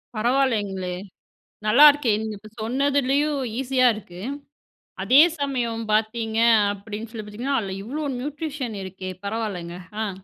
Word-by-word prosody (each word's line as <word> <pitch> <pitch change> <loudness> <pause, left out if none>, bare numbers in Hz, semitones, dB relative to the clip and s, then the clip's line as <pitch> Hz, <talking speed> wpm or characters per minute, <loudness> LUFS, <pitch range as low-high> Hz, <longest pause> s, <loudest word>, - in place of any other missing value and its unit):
பரவாயில்லேங்களே, 215 -7 0 0.7
நல்லாருக்கே! 285 +2 +6
நீங்க 220 -1 -4
இப்ப 215 +1 -13
சொன்னதுலயும் 280 +4 +1 0.2
ஈஸியா 255 -1 +3
இருக்கு. 180 -4 -10 0.8
அதே 265 +4 +6 0.2
சமயம் 240 -5 -2
பார்த்தீங்க 220 +1 0 0.3
அப்படின்னு 210 +2 -7
சொல்லி 220 -3 -7
பார்த்தீங்கன்னா, 245 +7 -2
அதில் 195 -1 -5
இவ்வளோ 290 +8 -4
நியூட்ரிஷன் 285 -4 -4
இருக்கே 185 0 -7 0.2
பரவாயில்லங்க. 200 -6 -4 0.3
ஆ. - - -2
230 Hz, 110 wpm, -24 LUFS, 210-270 Hz, 0.8 s, நல்லாருக்கே